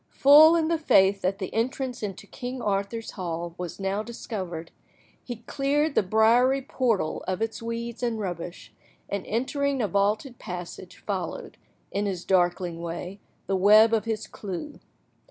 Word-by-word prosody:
Full 305 Hz, +4 st, +7 dB
in 325 Hz, -2 st, +2 dB
the 330 Hz, -1 st, +1 dB
faith 195 Hz, -9 st, +4 dB
that 190 Hz, +1 st, 0 dB
the 190 Hz, -, -5 dB
entrance 250 Hz, +2 st, -2 dB
into 200 Hz, -2 st, -5 dB
King 250 Hz, +4 st, -6 dB
Arthur's 205 Hz, +1 st, -2 dB
hall 170 Hz, -2 st, -4 dB
was 180 Hz, 0 st, -6 dB
now 195 Hz, +1 st, -1 dB
discovered, 190 Hz, -7 st, -6 dB, 0.5 s
he 240 Hz, -2 st, -7 dB
cleared 290 Hz, +2 st, 0 dB
the -, -, +4 dB
briary 235 Hz, +7 st, +3 dB
portal 230 Hz, -, -1 dB
of 185 Hz, +1 st, -1 dB
its 225 Hz, +1 st, -3 dB
weeds 230 Hz, +1 st, -5 dB
and 235 Hz, -2 st, -1 dB
rubbish, 175 Hz, -3 st, -6 dB, 0.4 s
and 200 Hz, -2 st, -2 dB
entering 275 Hz, +4 st, -1 dB
a 220 Hz, -, +1 dB
vaulted 210 Hz, -, 0 dB
passage, 180 Hz, +1 st, -8 dB
followed, 190 Hz, -5 st, -4 dB, 0.4 s
in 205 Hz, +1 st, -1 dB
his 185 Hz, -3 st, -4 dB
darkling 175 Hz, -2 st, +1 dB
way, 175 Hz, +3 st, -6 dB, 0.3 s
the 195 Hz, -, 0 dB
web 215 Hz, +4 st, +6 dB
of 220 Hz, -2 st, +1 dB
his 220 Hz, -2 st, -2 dB
clew. 205 Hz, -, -7 dB
210 Hz, 155 wpm, -26 LUFS, 185-245 Hz, 0.5 s, Full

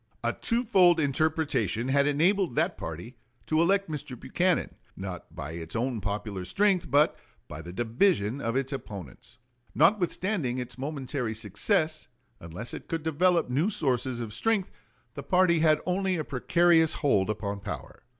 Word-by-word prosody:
A -, -, 0 dB
twofold 205 Hz, -8 st, +3 dB
interpretation 145 Hz, -, 0 dB
had 140 Hz, +1 st, +3 dB
enabled 170 Hz, +1 st, +2 dB
that -, -, +1 dB
party 85 Hz, +10 st, -7 dB, 0.3 s
to 155 Hz, +1 st, +2 dB
elect 195 Hz, +3 st, +2 dB
Mr. 140 Hz, -6 st, -5 dB
Buchanan, 175 Hz, +7 st, 0 dB, 0.2 s
not 95 Hz, -4 st, -7 dB
by 70 Hz, +3 st, -6 dB
its 80 Hz, +2 st, -7 dB
own 120 Hz, -1 st, -1 dB
popular 100 Hz, -1 st, -4 dB
strength, 190 Hz, -, +1 dB
but 145 Hz, +2 st, +4 dB, 0.3 s
by 80 Hz, +1 st, -8 dB
the 85 Hz, +2 st, -9 dB
division 120 Hz, -, +1 dB
of 115 Hz, +1 st, -2 dB
its 135 Hz, +1 st, -1 dB
opponents. 100 Hz, -, -8 dB, 0.4 s
Notwithstanding 175 Hz, -, +1 dB
its 125 Hz, -1 st, -6 dB
momentary 135 Hz, -5 st, -3 dB
success, 115 Hz, -, 0 dB, 0.3 s
unless 85 Hz, +8 st, -7 dB
it -, -, -8 dB
could 165 Hz, -2 st, -3 dB
develop 170 Hz, +2 st, +2 dB
new 150 Hz, +10 st, +2 dB
sources 130 Hz, -, -1 dB
of 110 Hz, -2 st, -5 dB
strength 210 Hz, -, +1 dB, 0.4 s
the -, -, -6 dB
party 180 Hz, -2 st, +3 dB
had 155 Hz, -1 st, +4 dB
only 185 Hz, +1 st, 0 dB
a 155 Hz, -, -2 dB
precarious 160 Hz, +4 st, +3 dB
hold 105 Hz, -10 st, +1 dB
upon 100 Hz, -1 st, -3 dB
power. 100 Hz, 0 st, -7 dB
140 Hz, 150 wpm, -28 LUFS, 110-170 Hz, 0.4 s, but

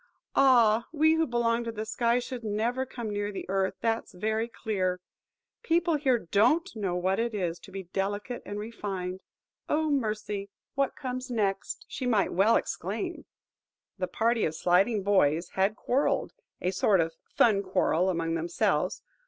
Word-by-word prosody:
Ah! 235 Hz, -4 st, +5 dB
we 315 Hz, 0 st, +4 dB
who 320 Hz, 0 st, +2 dB
belong 235 Hz, -1 st, +1 dB
to 230 Hz, -, -3 dB
the 215 Hz, -1 st, -5 dB
sky 235 Hz, +2 st, +1 dB
should 250 Hz, -1 st, -4 dB
never 230 Hz, +5 st, -1 dB
come 235 Hz, -4 st, -5 dB
near 205 Hz, 0 st, -2 dB
the 195 Hz, -, -6 dB
earth, 190 Hz, 0 st, 0 dB
that's 225 Hz, -4 st, -1 dB
very 220 Hz, +4 st, -1 dB
clear. 190 Hz, -6 st, -2 dB, 0.6 s
People 335 Hz, +1 st, +2 dB
here 275 Hz, -5 st, +3 dB
don't 235 Hz, -, +2 dB
know 195 Hz, -5 st, -2 dB
what 185 Hz, +3 st, 0 dB
it 230 Hz, -1 st, -1 dB
is 175 Hz, -4 st, -2 dB
to 195 Hz, -, -14 dB
be 195 Hz, 0 st, -5 dB
delicate 205 Hz, +6 st, -3 dB
and 205 Hz, -, -6 dB
refined. 195 Hz, -4 st, -4 dB, 0.5 s
Oh, 310 Hz, 0 st, +1 dB
mercy! 215 Hz, -6 st, -2 dB, 0.2 s
what 275 Hz, -1 st, 0 dB
comes 255 Hz, -1 st, -5 dB
next?... 200 Hz, -5 st, -1 dB
" -, -, -50 dB
She 255 Hz, -, -4 dB
might 215 Hz, -5 st, +2 dB
well 200 Hz, +5 st, +4 dB
exclaim. -, -, -3 dB, 0.7 s
The 185 Hz, -, 0 dB
party 230 Hz, +3 st, +1 dB
of 155 Hz, -, 0 dB
sliding 195 Hz, +6 st, +2 dB
boys 170 Hz, -5 st, +2 dB
had 195 Hz, +3 st, +1 dB
quarrelled,–a 260 Hz, -, -1 dB
sort 190 Hz, +1 st, +3 dB
of 165 Hz, 0 st, +1 dB, 0.2 s
fun 210 Hz, -4 st, +4 dB
quarrel 185 Hz, -2 st, +1 dB
among 165 Hz, -2 st, -1 dB
themselves. 165 Hz, +1 st, 0 dB
215 Hz, 160 wpm, -28 LUFS, 190-240 Hz, 0.7 s, Ah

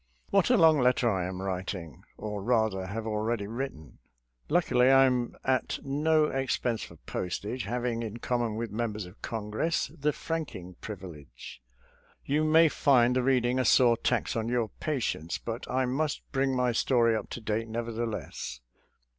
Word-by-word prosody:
What -, -, +3 dB
a -, -, +5 dB
long 160 Hz, -2 st, +6 dB
letter 125 Hz, -1 st, +3 dB
I 90 Hz, -3 st, -1 dB
am 95 Hz, 0 st, -5 dB
writing 90 Hz, -, -4 dB
— -, -, -38 dB
or 105 Hz, -1 st, -4 dB
rather 110 Hz, -4 st, +1 dB
have 110 Hz, +3 st, -4 dB
already 110 Hz, 0 st, -1 dB
written! 105 Hz, -, -6 dB, 0.5 s
Luckily 130 Hz, -7 st, +3 dB
I 135 Hz, 0 st, +7 dB
am 125 Hz, -2 st, 0 dB
at 130 Hz, -1 st, 0 dB
no 150 Hz, +3 st, +2 dB
ex 135 Hz, -3 st, -1 dB
pense 115 Hz, -3 st, -1 dB
for -, -, -8 dB
postage, 105 Hz, +7 st, -4 dB
having, 120 Hz, +1 st, -2 dB
in 110 Hz, -1 st, -5 dB
common 120 Hz, -2 st, -1 dB
with 115 Hz, -1 st, -4 dB
mem 115 Hz, 0 st, -2 dB
bers 105 Hz, -2 st, -5 dB
of 90 Hz, -, -12 dB
V -, -, -35 dB
Congress, 110 Hz, +8 st, -2 dB
the 150 Hz, +1 st, +1 dB
franking 145 Hz, -, -5 dB
privilege. 85 Hz, -, -9 dB, 0.6 s
You 150 Hz, +3 st, +1 dB
may 160 Hz, +1 st, +6 dB
find 125 Hz, -5 st, +3 dB
the 130 Hz, -, +3 dB
reading 125 Hz, -1 st, +2 dB
a -, -, +2 dB
sore 120 Hz, 0 st, +5 dB
tax -, -, 0 dB
on 115 Hz, 0 st, -1 dB
your 120 Hz, -3 st, 0 dB
patience, 120 Hz, -, -2 dB
but 115 Hz, +1 st, -6 dB
I 130 Hz, +1 st, +1 dB
must 145 Hz, +4 st, -1 dB
bring 135 Hz, -1 st, +1 dB
my 125 Hz, -1 st, +2 dB
story 115 Hz, -1 st, +3 dB
up 110 Hz, -, -4 dB
to -, -, -5 dB
date, 110 Hz, 0 st, -2 dB
neverthe 115 Hz, 0 st, -3 dB
less. 65 Hz, -, -6 dB
120 Hz, 175 wpm, -29 LUFS, 105-130 Hz, 0.6 s, I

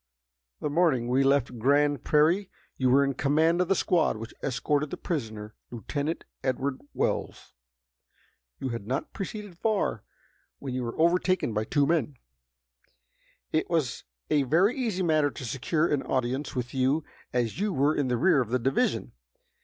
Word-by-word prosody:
The -, -, -1 dB
morning 145 Hz, -7 st, +2 dB
we 130 Hz, +2 st, +3 dB
left 135 Hz, -3 st, +1 dB
Grand 145 Hz, +3 st, +2 dB
Prairie 165 Hz, +6 st, +3 dB, 0.3 s
you 130 Hz, -1 st, +1 dB
were 135 Hz, +3 st, +5 dB
in 140 Hz, 0 st, 0 dB
command 160 Hz, +6 st, +2 dB
of 180 Hz, -, +1 dB
the 195 Hz, -, +3 dB
squad 170 Hz, -12 st, +2 dB
which 115 Hz, +1 st, -8 dB
escorted 145 Hz, +3 st, 0 dB
the -, -, -5 dB
prisoner, 110 Hz, -9 st, -4 dB, 0.2 s
Lieutenant 145 Hz, +7 st, -3 dB, 0.2 s
Edward 130 Hz, +1 st, -1 dB
Wells. -, -, -2 dB, 1.0 s
You 130 Hz, -, -3 dB
had 115 Hz, -4 st, -5 dB
not 130 Hz, +3 st, -3 dB
proceeded 200 Hz, -2 st, -6 dB
far 210 Hz, -, 0 dB, 0.5 s
when 135 Hz, -2 st, -6 dB
you 130 Hz, -, -2 dB
were 115 Hz, +2 st, -5 dB
overtaken 175 Hz, -5 st, +2 dB
by 105 Hz, +1 st, -1 dB
two 145 Hz, +4 st, +2 dB
men. 150 Hz, -4 st, 0 dB, 1.4 s
It 155 Hz, -, +1 dB
was 160 Hz, -8 st, -1 dB, 0.3 s
a 150 Hz, -, +4 dB
very 170 Hz, -, +3 dB
easy 220 Hz, -8 st, -1 dB
matter 155 Hz, -3 st, +3 dB
to 135 Hz, -, -8 dB
secure 140 Hz, +7 st, 0 dB
an 145 Hz, -2 st, +1 dB
audience 130 Hz, +2 st, -2 dB
with 125 Hz, -1 st, -3 dB
you 135 Hz, +4 st, +1 dB, 0.3 s
as 120 Hz, -, -1 dB
you 210 Hz, +1 st, 0 dB
were 145 Hz, -1 st, +2 dB
in 145 Hz, -3 st, 0 dB
the 125 Hz, -1 st, +1 dB
rear 165 Hz, 0 st, +4 dB
of 120 Hz, -, -3 dB
the 125 Hz, -, +2 dB
division. 130 Hz, +2 st, 0 dB
140 Hz, 160 wpm, -27 LUFS, 125-165 Hz, 1.4 s, were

